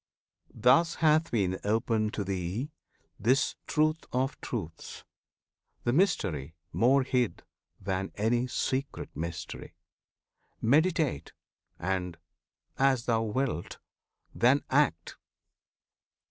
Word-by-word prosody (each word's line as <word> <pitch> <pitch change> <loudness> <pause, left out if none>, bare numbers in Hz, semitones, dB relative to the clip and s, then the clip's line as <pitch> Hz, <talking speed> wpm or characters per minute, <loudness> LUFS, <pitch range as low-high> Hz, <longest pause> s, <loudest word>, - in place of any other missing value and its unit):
Thus 160 +7 +4
hath 155 0 +3
been 95 -5 0
opened 110 0 +1
thee 100 - -3 0.5
This 130 +6 +2
Truth 155 +1 +1
of 130 +3 -1
Truths, 85 -9 -6 0.8
the 120 - +1
Mystery 95 - +1 0.2
more 130 +4 +4
hid 125 -3 0 0.4
Than 95 0 -2
any 120 +4 +1
secret 130 +2 -3
mystery. 85 +1 -6 0.8
Meditate! 155 - +2 0.4
And 90 -1 -2 0.6
as 135 -3 +3
thou 115 -2 +2
wilt 115 - -2 0.6
then 130 +4 +3
act! 135 - +1
120 Hz, 90 wpm, -29 LUFS, 95-135 Hz, 0.8 s, Thus